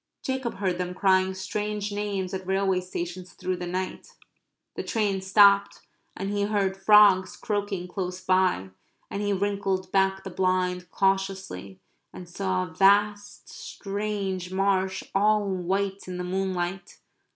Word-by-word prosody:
Jacob 260 -2 -2
heard 185 -2 -1
them 180 0 -3
crying 190 0 +3
strange 210 +2 -3
names 200 -2 -3
at 190 -1 -5
railway 190 -1 +1
stations 180 0 -6
through 185 0 -3
the 180 0 -5
night. 185 +1 -4 0.6
The - - -4
train 205 -4 -1
stopped 200 +1 +5 0.4
and 195 +1 -3
he 205 0 -1
heard 200 -2 0
frogs 195 -1 +5
croaking 205 -3 -2
close 180 0 -4
by, 185 - +1 0.4
and 200 - -3
he 205 0 0
wrinkled 195 -1 -1
back 190 0 +2
the 195 - -7
blind 180 0 0
cautiously 190 - -1 0.3
and 180 - -10
saw 185 +1 -1
a 165 - -12
vast 205 +2 +2
strange 195 -3 -4
marsh 190 0 0
all 210 +1 +3
white 195 +1 -2
in 180 -1 -5
the 180 - -3
moonlight. 185 0 -3
190 Hz, 140 wpm, -26 LUFS, 185-200 Hz, 0.6 s, stopped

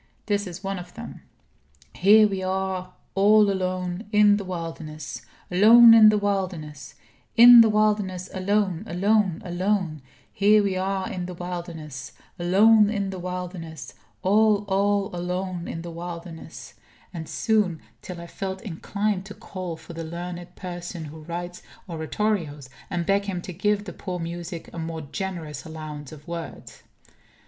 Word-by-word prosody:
This 205 -1 0
is 180 +2 -8
one 195 -1 -3
of 180 - -11
them: - - -9 0.7
"Here 210 +3 +6
we 195 -2 -3
are 185 -1 -2 0.2
all 205 +1 +5
alone 185 +1 -3
in 210 -1 +5
the 205 - -4
wilderness 165 -4 -6 0.3
alone 225 +5 +8
in 220 -1 +9
the 215 - +3
wilderness 185 -8 -3 0.4
in 240 0 +10
the 225 - +5
wilderness 210 -4 +1
alone, 195 -1 0
alone, 195 -1 +1
alone 180 -3 -1 0.3
here 210 +1 +4
we 195 -2 0
are 190 0 -1
in 180 -1 -4
the 180 - -7
wilderness 165 -7 -7 0.3
alone 205 +4 +5
in 200 -3 -2
the 190 - -6
wilderness 175 -5 -6 0.3
all 210 +1 +4
all 200 0 +1
alone 180 0 -3
in 165 - -5
the 170 - -7
wilderness," 170 -1 -8 0.4
and 160 -3 -7
soon, 210 -7 +1 0.2
till 180 -2 -8
I 170 - -8
felt 190 +3 -6
inclined 200 +1 -2
to 210 - -9
call 185 -4 -6
for 160 +2 -12
the 165 0 -5
learned 175 +2 -7
person 175 -2 -6
who 155 +2 -10
writes 175 +1 -6 0.3
Oratorios, 160 -4 -2 0.2
and 175 -1 -2
beg 200 +2 +2
him 190 -3 -3
to 180 - -7
give 205 +3 0
the 180 - -7
poor 180 -2 -5
music 170 0 -6
a 170 - -6
more 160 0 -4
generous 155 -1 -5
allowance 155 -3 -8
of 150 -1 -13
words. 170 -1 -8
185 Hz, 150 wpm, -25 LUFS, 170-200 Hz, 0.7 s, in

